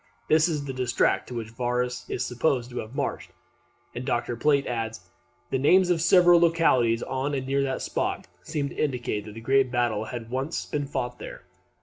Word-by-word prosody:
This 155 Hz, +1 st, +5 dB
is 150 Hz, -4 st, -2 dB
the 135 Hz, -, -4 dB
district 125 Hz, -2 st, +1 dB
to 125 Hz, -, -7 dB
which 115 Hz, -1 st, -5 dB
Varus 125 Hz, +1 st, -2 dB
is 130 Hz, -, -2 dB
supposed 125 Hz, -1 st, 0 dB
to 120 Hz, -, -4 dB
have 110 Hz, +5 st, -7 dB
marched; -, -, -3 dB, 0.6 s
and 120 Hz, -, -5 dB
Dr. 120 Hz, -2 st, -1 dB
Plate 140 Hz, +3 st, +2 dB
adds, 115 Hz, -2 st, -3 dB
that -, -, -24 dB, 0.5 s
"the 130 Hz, -, +1 dB
names 180 Hz, +6 st, +4 dB
of 165 Hz, -2 st, +1 dB
several 175 Hz, 0 st, +6 dB
localities 145 Hz, -9 st, +3 dB
on 135 Hz, +2 st, -2 dB
and 130 Hz, -1 st, -3 dB
near 140 Hz, +1 st, +1 dB
that 135 Hz, -1 st, -2 dB
spot -, -, -2 dB, 0.2 s
seem 145 Hz, -, -3 dB
to -, -, -11 dB
indicate 120 Hz, -7 st, -2 dB
that 105 Hz, 0 st, -10 dB
a -, -, -7 dB
great 135 Hz, +2 st, +3 dB
battle 120 Hz, -4 st, 0 dB
had 115 Hz, -1 st, -7 dB
once 135 Hz, +6 st, -2 dB
been 145 Hz, -1 st, -3 dB
fought 125 Hz, -3 st, -4 dB
there. -, -, -9 dB
130 Hz, 200 wpm, -26 LUFS, 120-145 Hz, 0.6 s, several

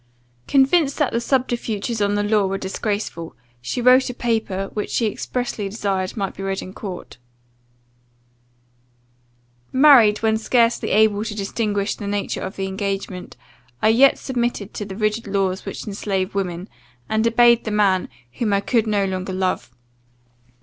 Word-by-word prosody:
] 120 Hz, 0 st, -38 dB
Convinced 275 Hz, +2 st, +3 dB
that 295 Hz, -4 st, 0 dB
the 235 Hz, -, 0 dB
subterfuges 235 Hz, -4 st, -1 dB
of 205 Hz, 0 st, +1 dB
the 205 Hz, -, 0 dB
law 205 Hz, -1 st, +2 dB
were 195 Hz, +1 st, -2 dB
disgraceful, 195 Hz, -3 st, -4 dB, 0.3 s
she 180 Hz, -, -3 dB
wrote 255 Hz, +1 st, +5 dB
a 250 Hz, -, -6 dB
paper, 220 Hz, -5 st, -2 dB
which 210 Hz, -, -3 dB
she 235 Hz, -, 0 dB
expressly 220 Hz, -1 st, -3 dB
desired 195 Hz, -2 st, -2 dB
might 195 Hz, -2 st, -2 dB
be -, -, -8 dB
read 195 Hz, 0 st, -3 dB
in 185 Hz, -, -9 dB
court: 190 Hz, -, -8 dB, 2.5 s
"Married 255 Hz, -7 st, +6 dB
when 220 Hz, 0 st, +3 dB
scarcely 230 Hz, +1 st, +1 dB
able 210 Hz, 0 st, +3 dB
to 215 Hz, -2 st, -5 dB
distinguish 205 Hz, 0 st, -1 dB
the 205 Hz, -, -7 dB
nature 205 Hz, 0 st, -2 dB
of 190 Hz, -, -5 dB
the 195 Hz, -, -3 dB
engagement, 195 Hz, -3 st, -4 dB, 0.4 s
I 220 Hz, -, +3 dB
yet 260 Hz, +5 st, +5 dB
submitted 240 Hz, -5 st, -3 dB
to 210 Hz, -, -5 dB
the 195 Hz, -1 st, -7 dB
rigid 215 Hz, +1 st, -1 dB
laws 195 Hz, -2 st, -1 dB
which -, -, -6 dB
enslave 195 Hz, -2 st, -2 dB
women, 185 Hz, -2 st, -3 dB, 0.4 s
and 220 Hz, +1 st, +1 dB
obeyed 235 Hz, 0 st, +5 dB
the -, -, -4 dB
man 200 Hz, -3 st, +2 dB, 0.2 s
whom 210 Hz, -, -1 dB
I 200 Hz, -, +3 dB
could 225 Hz, +1 st, +1 dB
no 205 Hz, -2 st, +1 dB
longer 185 Hz, 0 st, -3 dB
love. 185 Hz, -8 st, -1 dB
210 Hz, 155 wpm, -21 LUFS, 195-230 Hz, 2.5 s, Married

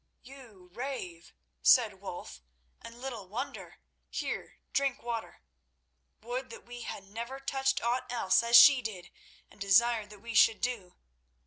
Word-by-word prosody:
"You 245 Hz, -9 st, -15 dB
rave," 220 Hz, -9 st, -6 dB, 0.3 s
said -, -, +4 dB
Wulf; -, -, -8 dB, 0.4 s
"and 235 Hz, +1 st, -11 dB
little 240 Hz, -7 st, -6 dB
wonder. 215 Hz, +6 st, -6 dB, 0.3 s
Here, -, -, -5 dB, 0.2 s
drink 275 Hz, -2 st, 0 dB
water. 235 Hz, -2 st, -5 dB, 0.8 s
Would 250 Hz, +3 st, -5 dB
that 230 Hz, -, -11 dB
we 240 Hz, 0 st, -9 dB
had 200 Hz, -, -6 dB
never 235 Hz, +7 st, -7 dB
touched 270 Hz, 0 st, 0 dB
aught 250 Hz, +1 st, -1 dB
else, 230 Hz, -6 st, +3 dB
as 235 Hz, 0 st, +2 dB
she 260 Hz, +2 st, +9 dB
did, 195 Hz, -6 st, -7 dB, 0.4 s
and -, -, -20 dB
desired 215 Hz, +2 st, +3 dB
that 210 Hz, -, -12 dB
we 230 Hz, +3 st, -8 dB
should 220 Hz, +2 st, +5 dB
do. 235 Hz, -8 st, -3 dB
235 Hz, 140 wpm, -30 LUFS, 205-255 Hz, 0.8 s, she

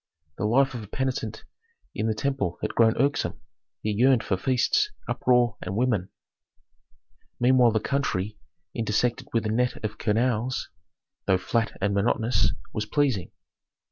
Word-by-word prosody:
The -, -, 0 dB
life 130 Hz, +5 st, +3 dB
of 120 Hz, -, -5 dB
a 105 Hz, -, -9 dB
penitent 120 Hz, -3 st, -3 dB, 0.5 s
in 110 Hz, -, -1 dB
the 110 Hz, -, 0 dB
temple 130 Hz, -7 st, -1 dB
had -, -, -2 dB
grown 115 Hz, -1 st, +4 dB
irksome; 140 Hz, +3 st, 0 dB, 0.4 s
he 110 Hz, -, 0 dB
yearned 125 Hz, +3 st, +4 dB
for 95 Hz, -, 0 dB
feasts, 130 Hz, -, +2 dB, 0.2 s
uproar, 125 Hz, -3 st, +2 dB
and 95 Hz, +1 st, -4 dB
women. 110 Hz, -6 st, +1 dB, 1.3 s
Meanwhile 125 Hz, -1 st, +5 dB
the 110 Hz, -, +2 dB
country, 105 Hz, -8 st, -1 dB, 0.3 s
intersected 115 Hz, +1 st, 0 dB
with 115 Hz, -1 st, 0 dB
a -, -, 0 dB
net 125 Hz, +2 st, +1 dB
of 105 Hz, -, -5 dB
canals, 120 Hz, +2 st, 0 dB, 0.6 s
though 95 Hz, -, +4 dB
flat 115 Hz, +4 st, -1 dB
and 100 Hz, +1 st, +1 dB
monotonous, 115 Hz, +3 st, +2 dB, 0.2 s
was 105 Hz, 0 st, -2 dB
pleasing. 130 Hz, -, +1 dB
115 Hz, 140 wpm, -26 LUFS, 105-130 Hz, 1.3 s, Meanwhile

